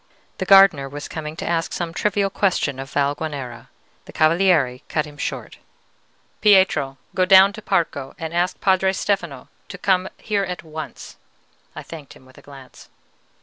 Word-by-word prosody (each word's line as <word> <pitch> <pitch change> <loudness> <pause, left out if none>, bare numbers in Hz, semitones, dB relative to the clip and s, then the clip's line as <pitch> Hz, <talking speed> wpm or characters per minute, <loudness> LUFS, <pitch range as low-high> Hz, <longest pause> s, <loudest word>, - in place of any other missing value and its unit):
The 190 - -3
gardener 195 -9 +6
was 145 +1 -7
coming 155 -1 -6
to - - -6
ask 165 -1 -1
some 170 -2 -4
trivial 200 +1 0
question 175 -9 0
of 135 0 -7
Valguanera. 140 -4 -3 0.4
The - - -12
Cavaliere 155 -6 +2
cut 155 -1 -1
him 150 -1 -12
short. - - -6 0.8
"Pietro, 190 -10 +3 0.2
go 185 - +1
down 190 +2 +6
to 215 - -9
Parco 140 -9 -2
and 160 0 -6
ask 175 +1 -1
Padre 190 0 +2
Stefano 170 -10 -3 0.2
to 200 - -8
come 185 0 +1
here 205 -2 -1
at 180 -2 -5
once." 155 -2 -9 0.6
(I - - -7
thanked 155 -4 -11
him 130 - -19
with 130 - -18
a - - -17
glance.) 135 -2 -15
165 Hz, 160 wpm, -21 LUFS, 145-190 Hz, 0.8 s, gardener